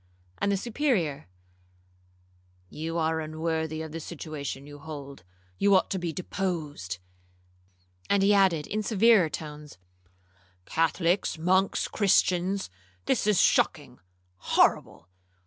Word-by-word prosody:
And 200 - +1
to 200 - +2
the - - -2
Superior, 215 - -1 1.4
'You 165 - -4
are 160 0 0
unworthy 160 0 -3
of 160 - -8
the 165 - -5
situation 150 -4 -6
you 145 0 -11
hold,—you 140 - -3
ought 185 - +2
to 190 - -1
be 175 -2 -3
deposed.' 155 - -4 1.1
And 200 -1 +3
he 205 +1 +5
added 185 -7 +3
in 215 - -2
severer 215 -4 +4
tones, 150 -2 -8 0.9
'Catholics, 170 +3 0
monks, 185 +4 +1
Christians, 190 - +1 0.3
this - - +1
is 210 -4 +3
shocking,—horrible! 90 - 0
160 Hz, 110 wpm, -27 LUFS, 145-190 Hz, 1.4 s, he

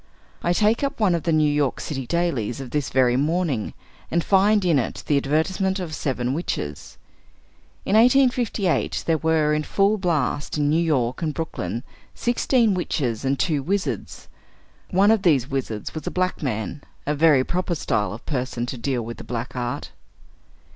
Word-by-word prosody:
I 175 - +1
take 215 +7 +2
up 275 - -2
one 205 -5 +3
of 170 - 0
the 170 - +2
New 155 -1 +3
York 145 -3 0
City 135 -5 -4
dailies 135 -10 -1
of 130 -3 -7
this 150 -3 -1
very 125 -1 +3
morning, 150 - 0 0.3
and 170 +1 +1
find 200 +1 +3
in 165 -6 +4
it 120 - -4
the 145 - +2
advertisements 180 +7 0
of 170 -4 -5
seven 130 -4 -1
Witches. 75 - -4 0.9
In - - -1
1858, 240 -5 +3
there 160 -2 +1
were 160 -1 +2
in 150 - +1
full 200 +6 +1
blast 150 -5 -1
in 145 0 +2
New 160 +2 +3
York 130 -6 0
and 155 -3 -2
Brooklyn 120 - -4 0.3
sixteen 240 -2 +2
witches 140 - -2
and 135 +1 +1
two 150 -3 0
wizards. 195 +7 -3 0.6
One 195 +3 +4
of 225 -3 +3
these 140 - +2
wizards 120 -6 -3
was 155 -2 -6
a - - +2
black 185 0 -1
man; 125 +1 -3 0.2
a 150 - 0
very 150 -3 +4
proper 180 +3 -1
style 105 - -1
of 110 +4 -9
person 125 -4 -2
to 125 0 -6
deal 125 -1 -1
with 115 +1 -7
the - - -9
black 120 +1 -5
art. 120 0 -4
155 Hz, 175 wpm, -23 LUFS, 130-185 Hz, 0.9 s, in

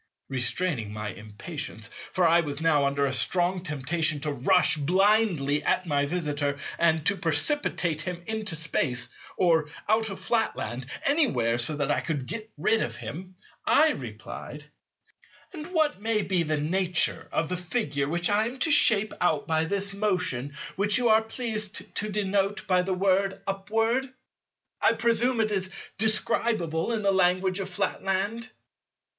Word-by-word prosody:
Restraining 130 - -1
my 105 0 -4
impatience—for 110 - -4
I 165 +1 +5
was 145 -4 -2
now 155 -3 +3
under 140 0 +1
a 135 - -1
strong 180 +6 +1
temptation 155 0 -1
to 150 0 -2
rush 160 +5 +3
blindly 175 -3 +2
at 185 - +1
my 145 -3 +1
Visitor 145 -4 -1 0.2
and 160 -2 +2
to 200 - +3
precipitate 170 - 0
him 175 0 -5
into 215 -5 -2
Space, 135 -5 -1 0.3
or 160 -4 +3 0.2
out 220 +1 +2
of 195 - -7
Flatland, 130 - -1 0.2
anywhere, 125 - +2
so 120 +6 +1
that 145 -1 -1
I - - +1
could 145 -6 -3
get 215 - -6
rid 225 - +2
of 115 - -3
him—I 180 - 0
replied:— 125 +5 -8 0.9
"And 310 -2 -7
what 315 - 0
may 220 -1 +1
be 185 -3 +1
the 155 -2 0
nature 170 0 +1
of 165 - 0
the 180 - -1
Figure 150 - -2
which 175 +2 0
I 210 +2 +2
am 250 +3 -5
to 320 - +3
shape 215 -7 +4
out 155 -4 +1
by 160 0 +1
this 200 +2 -1
motion 180 -9 -1 0.2
which 205 +3 +2
you 245 -2 +2
are 220 0 +6
pleased 220 -2 -4
to 215 - -1
denote 200 0 -1
by 185 -1 +3
the 185 +1 -1
word 195 +1 +1
'upward'? 225 +6 0 0.7
I - - +4
presume 235 +1 +1
it 215 -1 0
is 190 -2 -2 0.3
describable 215 -5 +1
in 220 -2 -1
the 200 - +3
language 185 0 +2
of 190 -1 -4
Flatland." 195 +5 -2
180 Hz, 150 wpm, -27 LUFS, 150-215 Hz, 0.9 s, are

